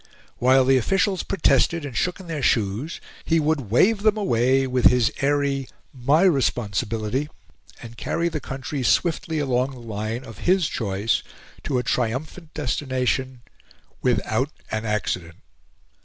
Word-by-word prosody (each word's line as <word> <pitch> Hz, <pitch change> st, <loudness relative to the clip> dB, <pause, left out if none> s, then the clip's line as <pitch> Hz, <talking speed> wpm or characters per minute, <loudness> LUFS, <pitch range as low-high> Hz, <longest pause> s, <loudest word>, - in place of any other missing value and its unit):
While 130 Hz, +1 st, +5 dB
the 135 Hz, 0 st, +5 dB
officials 195 Hz, -, +1 dB
protested 170 Hz, -4 st, +2 dB
and 135 Hz, -4 st, -7 dB
shook 180 Hz, -, -1 dB
in 190 Hz, -, -10 dB
their 160 Hz, -4 st, -4 dB
shoes, 115 Hz, +6 st, 0 dB, 0.2 s
he 165 Hz, 0 st, +2 dB
would 150 Hz, -7 st, 0 dB
wave 200 Hz, -, +3 dB
them 215 Hz, 0 st, +3 dB
away 135 Hz, -, +2 dB
with 125 Hz, -1 st, 0 dB
his 125 Hz, -2 st, +5 dB
airy 140 Hz, -1 st, +1 dB, 0.3 s
"MY 140 Hz, +6 st, +2 dB
responsibility!" 120 Hz, -, 0 dB, 0.5 s
and 115 Hz, 0 st, -10 dB
carry 170 Hz, +7 st, -1 dB
the 160 Hz, -2 st, -2 dB
country 135 Hz, +1 st, -5 dB
swiftly 160 Hz, +4 st, +1 dB
along 130 Hz, -3 st, +1 dB
the 130 Hz, -2 st, -10 dB
line 110 Hz, +2 st, -4 dB
of 115 Hz, -4 st, -11 dB
his 185 Hz, -3 st, +2 dB
choice, 105 Hz, 0 st, -1 dB, 0.4 s
to 130 Hz, -, 0 dB
a 125 Hz, -, 0 dB
triumphant 135 Hz, +9 st, -2 dB
destination 130 Hz, -2 st, -1 dB, 0.6 s
without -, -, +1 dB, 0.2 s
an 110 Hz, +1 st, -2 dB
accident. 90 Hz, -5 st, -2 dB
130 Hz, 140 wpm, -23 LUFS, 120-155 Hz, 0.6 s, While